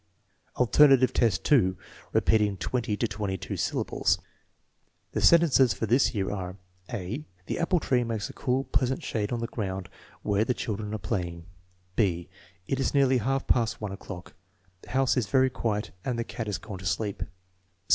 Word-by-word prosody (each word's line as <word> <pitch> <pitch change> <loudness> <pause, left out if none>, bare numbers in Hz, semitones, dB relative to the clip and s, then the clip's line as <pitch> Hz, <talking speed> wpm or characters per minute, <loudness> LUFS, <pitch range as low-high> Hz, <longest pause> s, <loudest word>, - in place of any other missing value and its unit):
X, - - -14
Alternative 130 0 +6
test 110 -8 +2
2: 95 -11 +3 0.3
repeating 105 -3 +3
twenty 110 +2 -1
to 115 - +1
twenty 100 -2 -3
two - - -5
syllables - - 0 0.9
The - - -2
sentences 140 - +5
for 105 - -2
this 120 +3 +3
year 95 -2 -1
are: 95 -2 -5 0.3
(a) 115 +5 -4
" 90 0 -34
The - - -3
apple 170 +1 +2
tree 125 -4 +1
makes 115 -3 -2
a - - -10
cool, 130 +1 0
pleasant 130 -1 0
shade 105 -2 -2
on 120 -1 -1
the - - -1
ground 95 -5 -4 0.3
where 105 +1 +2
the 125 +2 0
children 105 0 -3
are - - -1
playing" 90 -4 -3 0.5
(b) 85 -5 +1 0.4
"It 135 - -1
is 135 - 0
nearly 135 -2 +4
half 135 +4 0
past 115 -2 +1
one 105 -2 -4
o'clock; 95 -2 -8 0.5
the - - -15
house 135 0 +2
is 120 -5 +1
very 130 +5 +3
quiet 105 -3 -2
and 125 -3 -2
the 115 - 0
cat 115 -1 -6
has 100 -3 -1
gone 100 -1 -8
to 95 - -10
sleep." 100 +6 -2
110 Hz, 180 wpm, -28 LUFS, 100-130 Hz, 0.9 s, Alternative